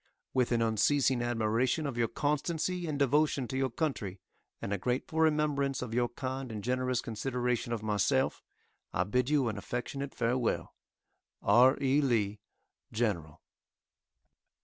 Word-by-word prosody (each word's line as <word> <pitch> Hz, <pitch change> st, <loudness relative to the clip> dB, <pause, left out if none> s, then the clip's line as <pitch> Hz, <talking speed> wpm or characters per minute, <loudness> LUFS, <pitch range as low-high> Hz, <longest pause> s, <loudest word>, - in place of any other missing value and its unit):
With 125 Hz, -2 st, +2 dB
an 115 Hz, -1 st, +3 dB
unceasing 125 Hz, +3 st, +2 dB
admiration 120 Hz, +5 st, +1 dB
of 140 Hz, -4 st, -3 dB
your 120 Hz, -1 st, +1 dB
constancy 165 Hz, +6 st, -1 dB
and 150 Hz, -2 st, -2 dB
devotion 140 Hz, -1 st, +2 dB
to -, -, -4 dB
your 135 Hz, 0 st, +1 dB
country, 115 Hz, -, -3 dB, 0.4 s
and 100 Hz, -, -3 dB
a 100 Hz, -, -1 dB
grateful 125 Hz, -, -2 dB
remembrance 150 Hz, -4 st, +2 dB
of 115 Hz, -3 st, -6 dB
your 120 Hz, 0 st, +1 dB
kind 130 Hz, +1 st, -4 dB
and 105 Hz, -2 st, -5 dB
generous 125 Hz, 0 st, 0 dB
consideration 125 Hz, +1 st, -2 dB
of 115 Hz, -2 st, -2 dB
myself, 105 Hz, -2 st, +1 dB, 0.5 s
I 95 Hz, -, +3 dB
bid 125 Hz, +7 st, 0 dB
you 145 Hz, -4 st, +3 dB
an 110 Hz, -2 st, -2 dB
affectionate 135 Hz, +5 st, -4 dB
farewell. 120 Hz, 0 st, 0 dB, 0.7 s
R. 125 Hz, +6 st, +6 dB
E. 140 Hz, +2 st, +3 dB
LEE, 110 Hz, -6 st, +1 dB, 0.5 s
General. 95 Hz, -10 st, -2 dB
125 Hz, 140 wpm, -31 LUFS, 115-140 Hz, 0.7 s, R